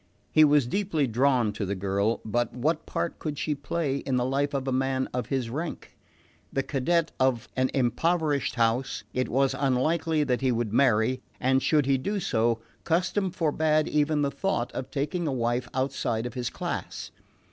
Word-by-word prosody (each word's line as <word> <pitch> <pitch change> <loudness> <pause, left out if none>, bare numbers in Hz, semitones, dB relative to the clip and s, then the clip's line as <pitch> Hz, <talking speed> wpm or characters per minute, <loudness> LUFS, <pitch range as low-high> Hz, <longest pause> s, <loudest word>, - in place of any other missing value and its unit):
He 155 - +6
was 145 -3 +5
deeply 165 +1 0
drawn 125 -2 +2
to 105 - -4
the 100 +1 -2
girl; 100 +4 0
but 120 +2 0
what 155 +6 -1
part 170 - -3
could 150 -2 -4
she 150 - -1
play 145 -1 -2
in 135 -2 -2
the 125 -1 +1
life 140 +2 0
of 135 -1 -2
a - - +1
man 130 0 0
of 125 0 -2
his 130 -3 -1
rank? 160 +5 -5 0.6
The 135 - 0
cadet 160 +5 +1
of 130 -3 +1
an 130 0 +2
impoverished 145 +3 +1
house, 120 +3 0
it 130 0 -1
was 135 +1 +2
unlikely 150 +4 +1
that 125 -3 0
he 130 -1 +2
would 115 -3 -1
marry; 125 0 +3 0.2
and 130 +1 +2
should 150 -1 +3
he 135 -1 +2
do 200 +10 -2
so, 115 -7 +1 0.2
custom 185 +3 +1
forbade 155 -3 +1
even 150 0 +1
the 140 - 0
thought 140 -4 -1
of 130 - -5
taking 155 +4 -2
a - - 0
wife 120 -1 -1
outside 130 -3 -1
of 120 - -5
his 125 -2 -2
class. - - -5
135 Hz, 180 wpm, -27 LUFS, 125-150 Hz, 0.6 s, He